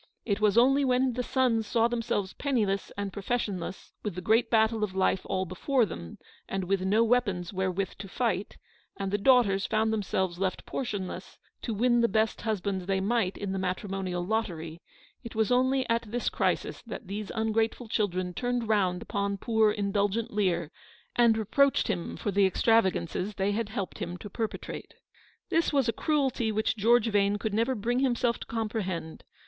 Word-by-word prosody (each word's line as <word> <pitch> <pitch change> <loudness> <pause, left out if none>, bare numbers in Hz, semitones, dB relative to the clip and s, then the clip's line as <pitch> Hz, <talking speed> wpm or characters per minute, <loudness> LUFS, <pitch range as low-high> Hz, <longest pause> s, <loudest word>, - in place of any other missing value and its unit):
It 205 0 -1
was 210 0 +3
only 270 +4 +5
when 255 -1 +2
the 250 - -1
sons 245 -4 +1
saw 230 -1 +3
themselves 230 -5 -2
penniless 215 -9 -1
and 200 -1 -3
professionless, 200 -4 -3
with 210 -5 -4
the 180 - -4
great 220 +5 +3
battle 220 -1 +3
of 190 -3 -2
life 190 0 +2
all 190 0 -1
before 235 - +1
them, 85 - -8 0.3
and 195 -1 -2
with 190 +1 0
no 205 +5 +3
weapons 210 -7 +1
wherewith 190 0 -1
to 195 - -6
fight; 200 -2 -2 0.4
and 195 -1 -3
the 205 - +1
daughters 205 -4 +4
found 220 0 +1
themselves 190 -4 -1
left 190 -1 -2
portionless, 205 -8 -5 0.2
to 230 - -3
win 240 +2 +3
the 235 - +4
best 220 +1 0
husbands 200 -4 -2
they 195 -1 +1
might 200 -1 0
in 200 -2 -4
the 195 - -2
matrimonial 185 -1 -2
lottery: 170 -6 -3 0.4
it 235 - -8
was 220 +1 +1
only 260 +1 +2
at 230 0 +2
this 240 +2 -1
crisis - - -1
that - - -8
these 200 +2 -5
ungrateful 225 +1 0
children 185 -4 -1
turned 245 +2 -1
round 190 -5 +1
upon 200 0 -2
poor, 220 +1 +3
indulgent 205 +2 0
Lear, 175 -6 0 0.4
and 235 -2 +5
reproached 270 +6 +2
him 170 - -2
for 205 - -2
the 195 0 +4
extravagances 190 -2 +1
they 195 +1 0
had 215 +1 -2
helped 200 -4 -4
him 175 +1 -4
to 205 +2 -9
perpetrate. 225 +1 -5 0.5
This 330 +1 +2
was 275 -4 +2
a 230 - +1
cruelty 270 -7 0
which 215 +1 0
George 230 +2 +4
Vane 205 0 +2
could 210 0 -3
never 230 +5 +1
bring 240 +3 0
himself 245 -2 +1
to - - -8
comprehend. 210 -8 -3
210 Hz, 175 wpm, -28 LUFS, 190-235 Hz, 0.5 s, only